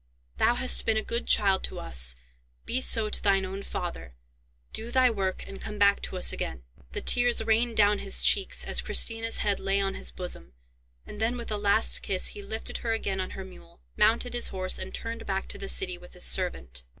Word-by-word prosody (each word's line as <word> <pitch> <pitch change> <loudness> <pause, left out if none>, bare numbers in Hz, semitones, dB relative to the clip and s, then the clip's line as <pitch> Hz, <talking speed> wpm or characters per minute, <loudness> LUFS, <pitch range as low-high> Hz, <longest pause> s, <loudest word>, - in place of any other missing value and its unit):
Thou 240 - +3
hast 255 +1 +3
been 220 -1 +2
a 220 - 0
good 235 +1 -3
child 195 -2 +3
to - - -7
us; - - +2 0.5
be 255 - -1
so 225 -4 +5
to - - +1
thine 195 -2 +2
own 190 +1 -6
father. 170 - -6 0.6
Do 225 +2 -5
thy 255 0 +3
work, 190 -3 -3
and 195 - -10
come 210 - -6
back 200 0 +4
to 185 - -5
us 180 - +2
again." 65 -2 -5 0.3
The - - -3
tears 245 -2 +4
rained 225 +1 +1
down 205 -1 +4
his 195 - +3
cheeks, 390 - +2
as - - 0
Christina's 225 0 +2
head 200 -2 +1
lay 195 +1 0
on 195 -1 0
his - - -5
bosom, 120 - -6 0.5
and 210 - -9
then 235 +2 0
with 235 -2 -7
a 210 - 0
last 205 +2 +2
kiss 185 -1 +1
he 205 - -8
lifted 220 +3 -5
her 230 -1 -2
again 195 -4 -2
on 185 - -6
her 190 - -7
mule, 85 - -16 0.2
mounted 230 +3 +2
his 240 - 0
horse, 185 -1 -2
and 185 - -6
turned 230 0 -6
back 195 0 -2
to - - -7
the 195 - -5
city, 180 -2 0
with 180 - -15
his 180 - -2
servant. 65 - -1
200 Hz, 215 wpm, -27 LUFS, 185-225 Hz, 0.6 s, so